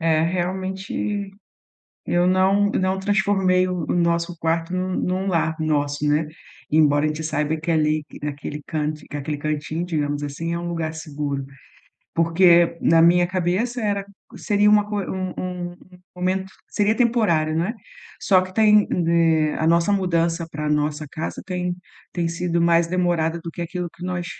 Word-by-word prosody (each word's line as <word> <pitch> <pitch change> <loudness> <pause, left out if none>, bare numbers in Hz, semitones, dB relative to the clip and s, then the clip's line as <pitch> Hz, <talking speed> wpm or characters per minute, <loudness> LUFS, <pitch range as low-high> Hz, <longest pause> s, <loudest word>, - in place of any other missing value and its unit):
É 160 -1 +2
realmente 190 +3 -2 0.8
eu 175 +1 +2
não, 190 +2 +3
não 185 0 0
transformei 190 -2 +2
o 180 -3 -3
o - - +1
nosso 170 0 0
quarto 165 +2 -1
num 185 0 -1
num 185 +2 -1
lar 165 -3 +1
nosso, 145 -2 0
né, 150 +2 +2 0.5
embora 150 -1 +4
a - - +2
gente 155 +1 -4
saiba 155 0 -1
que 160 +2 -2
ali 155 -1 +1 0.2
naquele 150 0 -5
canto 155 -1 -3
que 145 - -5
aquele 145 +1 -3
cantinho, 155 +3 -3
digamos 145 -4 -2
assim, 165 +4 -4
é 170 - -2
um 175 - -5
lugar 165 -2 -3
seguro, 145 -3 -4 0.7
porque 170 0 +4
na 165 0 +4
minha 175 +1 +5
cabeça 185 +7 -1
era 200 -2 -1 0.3
seria 205 0 +2
uma 210 0 +4
co 210 - -3
um 185 -1 -4
um 180 -1 -4
um 180 0 -18 0.2
momento 190 +1 -1 0.2
seria 210 +1 +1
temporário, 200 -11 +2
não 165 +2 +1
é, 220 - -3 0.5
só 185 -2 +4
que 185 0 -8
tem, 210 -1 +5 0.2
eh, 165 -2 +3
a 160 - 0
nossa 170 +4 +3
mudança 170 -3 0
para 150 0 -4
a - - 0
nossa 150 +1 0
casa 155 - -5
tem 180 -1 -2 0.4
tem 170 -2 -1
sido 170 0 -1
mais 170 0 +4
demorada 170 -2 0
do 165 - -6
que 170 - -6
aquilo 175 +1 -4
que 175 - -9
nós 180 -1 -3
170 Hz, 170 wpm, -22 LUFS, 155-185 Hz, 0.8 s, minha